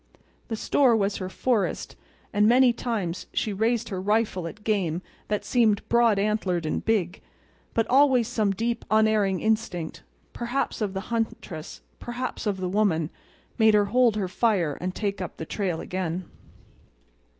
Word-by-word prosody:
The 225 - -3
store 245 +2 +3
was 200 -2 0
her 185 -1 -4
forest; 230 +1 -1 0.4
and 210 0 +4
many 245 +1 +5
times 210 -8 -3
she 215 - 0
raised 230 +3 0
her 190 -3 -3
rifle 205 -3 0
at 210 +5 -10
game 185 -6 0 0.2
that 210 -1 -2
seemed 220 -5 +2
broad 235 -3 +4
antlered 195 -5 0
and 155 - -2
big; 200 -6 0 0.5
but 225 - +3
always 255 -2 +4
some 220 -4 0
deep 230 +4 -1
unerring 215 -3 +3
instinct—perhaps 220 +5 -3
of 200 -2 -2
the 190 - -2
huntress, 210 -8 -4 0.2
perhaps 240 -1 -4
of 200 -2 0
the 185 -1 -2
woman—made 205 +3 0
her 205 -1 +4
hold 235 +1 +3
her 200 -3 -1
fire 185 - +1
and 180 +1 -3
take 200 -2 -2
up 180 - -6
the 160 - -5
trail 180 -2 -2
again. 180 -1 -3
210 Hz, 150 wpm, -26 LUFS, 185-230 Hz, 0.5 s, many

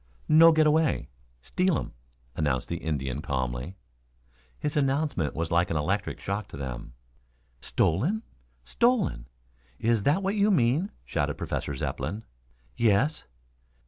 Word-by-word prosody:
"No 165 +2 +8
get 155 -1 +4
away. 155 -1 +2 0.3
Steal 180 - +1
um," - - -5 0.4
announced 70 -5 -1
the 85 - -2
Indian 70 -6 -3
calmly. 65 +5 -3 0.8
His 150 +2 -3
announcement 140 - 0
was 80 +1 -2
like 85 +1 +2
an 80 - 0
electric 95 +7 -1
shock 100 +1 -3
to 85 - -10
them. 65 -3 -6 0.6
"Stolen? 150 - 0 0.4
Stolen? 205 - +1 0.5
Is 115 -1 +1
that 150 - +2
what 195 +1 0
you 210 0 +3
mean?" 155 - +2 0.2
shouted 75 -2 -1
Professor 70 - -3
Zepplin. 80 +11 -3 0.5
"Yes." 115 - +2
105 Hz, 125 wpm, -27 LUFS, -, 0.8 s, No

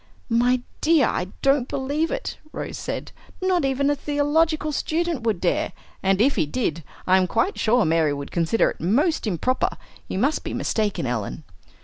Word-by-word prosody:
"My 245 +2 +3 0.2
dear, 315 -4 +4
I 180 - -1 0.2
don't 275 -2 +3
believe 285 +4 -1
it," - - -4
Rose - - -5
said, - - -5 0.3
"not 370 -3 +1
even 270 +1 +1
a 290 - +3
theological 300 +2 +1
student 325 0 -1
would 220 -5 0
dare! 175 - 0 0.3
and 195 0 +2
if 270 +6 +3
he 155 - +2
did, 170 -4 -2 0.2
I 185 +1 +5
am 185 -1 +2
quite 230 - 0
sure 235 0 +3
Mary 160 -1 +2
would 140 0 -5
consider 170 +6 +2
it - - -12
most 260 - +1
improper. 215 +7 0 0.3
You - - -4
must 275 +10 +1
be - - -4
mistaken, 210 -9 -1
Ellen." 120 +4 -3
250 Hz, 170 wpm, -23 LUFS, 185-295 Hz, 0.3 s, I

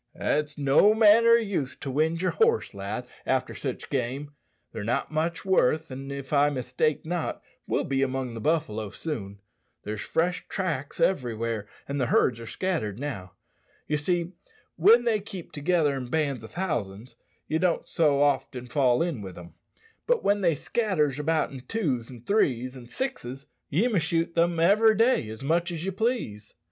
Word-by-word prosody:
"It's 150 0 -1
no 145 +10 +5
manner 225 +1 +6
o' - - +9
use 200 - -1
to 135 - -6
wind 160 +5 +1
yer 185 - +2
horse, 455 - +2
lad, 100 +5 -5 0.2
after 130 -1 0
sich 130 -3 -5
game. 135 +2 -2 0.4
They're 110 -2 -5
not 115 +7 -1
much 160 +3 -1
worth, 160 -4 +2
an', 135 +1 -7
if 140 0 -6
I 145 0 +5
mistake 130 +3 -1
not, 175 0 -3 0.2
we'll - - +1
be 135 -1 -1
among 130 -2 -1
the 115 - -6
buffalo 110 -9 0
soon. 100 -9 -6 0.4
There's 105 0 -4
fresh 175 +2 -1
tracks 160 -8 -3
everywhere, 115 - 0 0.2
and 140 0 -2
the 125 - +1
herds 115 -1 +2
are 115 - -8
scattered 160 - -2
now. 115 -10 -5 0.5
Ye 150 - 0
see, 170 +3 -1 0.4
when 220 +8 +6
they 230 -3 +2
keep 195 -4 -9
together 150 -1 +1
in 130 -2 -4
bands 140 -5 -1
o' - - -7
thousands 120 - -4 0.3
ye 160 +2 0
don't 180 -1 +1
so 145 -3 +3
often 130 -3 0
fall 125 +1 +2
in 165 -10 -3
wi' 95 -2 -7
them. 85 0 -12 0.5
But - - +2
when 205 0 +2
they 170 -4 +3
scatters 150 - 0
about 155 +1 +1
in 135 - -7
twos, 130 - -2
an' 120 -3 -11
threes, 130 - +1
an' 125 -2 -11
sixes 140 - -5 0.2
ye 185 - +2
may 215 -7 +2
shoot 165 0 0
them 170 0 +2
every 215 +6 +5
day 230 - +3
as 110 +3 -8
much 170 +4 +1
as 170 0 -4
ye 195 - -1
please." 195 - -2
145 Hz, 175 wpm, -27 LUFS, 125-175 Hz, 0.5 s, o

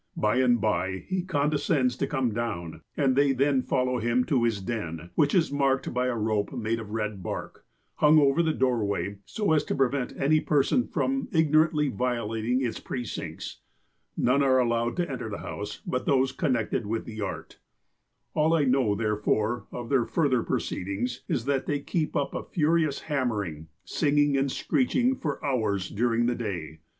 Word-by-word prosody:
By 105 +3 +2
and 125 -2 +4
by 95 -3 -1
he 185 -1 -1
condescends 145 -5 +1
to 140 - -1
come 130 -5 0
down, 85 -9 -4 0.2
and 135 -3 +2
they 140 0 +4
then 135 0 +2
follow 125 0 0
him 120 +2 +2
to 125 -3 +1
his 115 -4 0
den, 90 -5 -5
which 145 +1 +2
is 165 -6 +3
marked 135 -1 +1
by 125 +1 +1
a 125 - 0
rope 110 -2 0
made 115 -2 -1
of 110 -2 -8
red 105 -2 -3
bark, - - -6 0.3
hung 150 +1 +6
over 140 +1 +4
the 160 -1 +2
doorway, 100 - 0
so 210 -6 -1
as 155 -2 +3
to - - -2
prevent 135 -1 0
any 155 +3 +4
person 150 - +2
from 270 0 -1
ignorantly 155 -2 +3
violating 120 +1 -1
its 115 - -3
precincts. 120 -4 -6 0.6
None 130 +3 +3
are 130 -2 +4
allowed 120 -1 +1
to 175 -1 0
enter 125 -6 -5
the 100 - -4
house 105 +1 -6
but 125 - -2
those 135 -1 +3
connected 120 -6 -1
with 115 +1 -2
the 110 -1 -7
art. 95 - -6 0.7
"All 155 +2 +3
I 155 - +3
know, 130 -6 +2
therefore, 110 +2 0
of 120 -1 -6
their 130 -4 +3
further 140 -7 +2
proceedings, 100 +7 -3
is 120 - -1
that 140 -1 0
they 145 -1 0
keep 155 +2 -2
up 140 - 0
a - - -3
furious 155 -2 +1
hammering, 105 - -2 0.2
singing 145 -2 +2
and 135 0 +1
screeching 255 - +1
for 150 - -4
hours 110 -8 0
during 120 +2 +1
the 120 - +2
day. 85 -9 -5
125 Hz, 175 wpm, -27 LUFS, 110-145 Hz, 0.7 s, hung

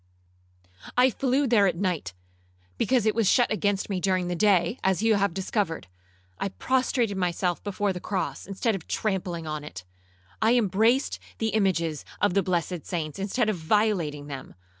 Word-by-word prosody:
I 255 +1 +5
flew 270 +3 +1
there 225 -6 +4
at 180 - 0
night, 170 - -2 0.6
because 250 -4 +2
it 215 - +3
was 225 -4 +2
shut 245 - +3
against 205 -2 0
me 195 -3 -2
during 185 0 0
the 175 - -1
day, 195 +3 +2
as 190 +2 +1
you 225 0 +4
have 200 -2 +2
discovered! 190 -1 -2 0.5
I 195 - -1
prostrated 245 -2 0
myself 180 -1 -1
before 205 -1 -1
the 180 - -5
cross, 190 0 -3
instead 200 +4 0
of 190 -5 -6
trampling 185 -5 -2
on 155 -1 -4
it! 95 -10 -9 0.6
I 225 +2 +4
embraced 225 +5 +2 0.2
the 225 - 0
images 170 -8 0 0.2
of 205 -2 +2
the 200 - +3
blessed 175 -2 -1
saints, 155 -2 -4
instead 210 +4 0
of 215 -3 0
violating 165 -5 +1
them! 140 -2 -8
195 Hz, 165 wpm, -26 LUFS, 175-220 Hz, 0.6 s, I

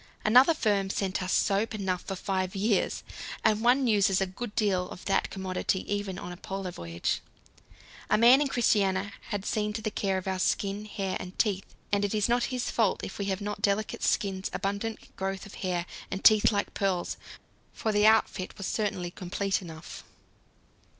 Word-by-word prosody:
Another 255 +9 +6
firm 200 -7 +1
sent 195 0 -1
us 185 0 -2
soap 210 +2 +2
enough 190 -3 -1
for 195 - -5
five 185 0 -2
years, 200 0 +1 0.4
and 215 0 +3
one 250 +3 +4
uses 200 -4 +3
a 195 - +2
good 205 +4 -7
deal 185 -4 +1
of 180 - -10
that 195 - +1
commodity 190 0 -1
even 205 -2 -3
on 180 - -6
a 180 - -8
Polar 195 0 -5
voyage. 85 - -3 0.9
A - - +4
man 245 +5 +7
in 295 - +2
Christiania 200 -6 +1
had 205 -3 -3
seen 210 -1 -1
to 220 - -4
the 215 - -1
care 195 -2 0
of 185 - -5
our 190 -1 -1
skin, 200 +2 0
hair, 195 -3 -3
and 185 +1 -8
teeth, 200 -4 -1 0.2
and 205 0 +2
it 205 +1 0
is 210 -1 +2
not 240 0 +2
his 250 -2 -2
fault 220 -5 +1
if 190 - -6
we 200 - -1
have 195 0 -2
not 205 0 -4
delicate 205 +1 0
skins, 195 -2 0
abundant 200 +3 -3
growth 195 +1 -3
of 200 - -12
hair, 180 -2 -2 0.2
and 195 - -4
teeth 215 0 +7
like 205 -1 -1
pearls, 190 -3 -1 0.6
for 220 - -2
the 210 0 +4
outfit 220 -4 +2
was 195 - -5
certainly 185 -5 -1
complete 195 +3 -2
enough. 160 -3 -9
200 Hz, 185 wpm, -28 LUFS, 190-215 Hz, 0.9 s, man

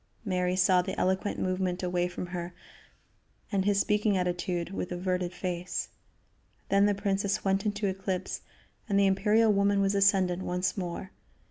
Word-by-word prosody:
Mary 180 -2 0
saw 185 -1 +4
the - - -4
eloquent 190 +2 0
movement 185 0 -1
away 180 0 0
from 180 0 -5
her 175 0 -6 1.0
and 195 -2 +1
his 200 -1 +3
speaking 210 -1 +2
attitude, 175 -1 -2
with 185 -2 -4
averted 180 0 -1
face; 180 0 -3 0.8
then 200 +1 +4
the 205 - +2
princess 200 0 -1
went 195 +2 +1
into 205 0 -1
eclipse, 190 -1 -2 0.5
and 200 -1 +3
the 200 - +5
imperial 210 +3 +3
woman 200 0 +2
was 195 0 +2
ascendant 195 -2 +3
once 180 +1 -1
more. 185 0 -5
190 Hz, 150 wpm, -29 LUFS, 180-200 Hz, 1.0 s, the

